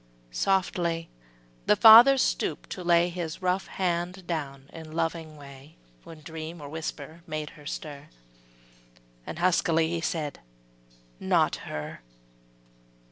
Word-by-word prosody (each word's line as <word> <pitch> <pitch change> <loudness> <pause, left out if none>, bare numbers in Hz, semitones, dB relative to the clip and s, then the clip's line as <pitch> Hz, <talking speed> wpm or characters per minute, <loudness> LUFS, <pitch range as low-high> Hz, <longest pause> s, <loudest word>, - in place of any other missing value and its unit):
Softly 170 - 0 0.6
the - - +5
father 235 - +9
stooped - - -1
to 185 - -5
lay 175 0 +3
His 175 0 -6
rough 185 +1 0
hand 180 0 -2
down 140 -5 -5
in 160 -1 -10
loving 165 -1 -3
way, 140 +1 -14 0.3
When 160 -2 -12
dream 160 +2 -8
or 145 - -8
whisper 160 +1 -7
made 155 -1 -4
her 150 -2 -13
stir, 145 -2 -7 1.2
And - - -6
huskily 165 -2 +2
he 170 -1 -2
said: 155 -4 -3 0.8
``Not - - +2 0.2
her!'' 75 0 -6
165 Hz, 120 wpm, -27 LUFS, 150-175 Hz, 1.2 s, father